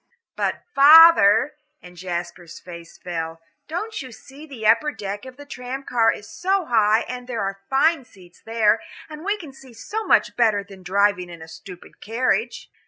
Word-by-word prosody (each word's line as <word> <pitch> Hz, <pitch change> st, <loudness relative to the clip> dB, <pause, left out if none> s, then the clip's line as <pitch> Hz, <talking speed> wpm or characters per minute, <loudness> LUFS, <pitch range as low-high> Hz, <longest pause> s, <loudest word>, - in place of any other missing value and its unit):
"But, -, -, -2 dB
father," 295 Hz, -4 st, +7 dB, 0.3 s
and 180 Hz, 0 st, -15 dB
Jasper's 175 Hz, -1 st, -7 dB
face 170 Hz, -2 st, -12 dB
fell, 165 Hz, -2 st, -6 dB, 0.3 s
"don't 430 Hz, +7 st, -5 dB
you 260 Hz, -2 st, -10 dB
see 270 Hz, +7 st, -14 dB
the 245 Hz, -7 st, -8 dB
upper 300 Hz, +7 st, +3 dB
deck 205 Hz, -2 st, -7 dB
of 260 Hz, -1 st, -12 dB
the 290 Hz, -, -12 dB
tram 260 Hz, -1 st, -7 dB
car 230 Hz, -4 st, +2 dB
is 205 Hz, -, -9 dB
so 380 Hz, -, -1 dB
high 220 Hz, -3 st, +3 dB
and 250 Hz, 0 st, -7 dB
there 235 Hz, -4 st, -4 dB
are 195 Hz, 0 st, -5 dB
fine 295 Hz, +2 st, +2 dB
seats 185 Hz, -7 st, -20 dB
there, 225 Hz, -1 st, +1 dB, 0.3 s
and 305 Hz, +1 st, -9 dB
we 405 Hz, +2 st, -1 dB
can 315 Hz, -9 st, -11 dB
see 265 Hz, -2 st, -16 dB
so 425 Hz, -, -5 dB
much -, -, +2 dB
better 220 Hz, -4 st, +2 dB
than 195 Hz, -1 st, -15 dB
driving 190 Hz, 0 st, 0 dB
in 170 Hz, -2 st, -11 dB
a -, -, -12 dB
stupid 180 Hz, +3 st, -13 dB
carriage?" 250 Hz, -, -2 dB
225 Hz, 175 wpm, -22 LUFS, 190-275 Hz, 0.3 s, father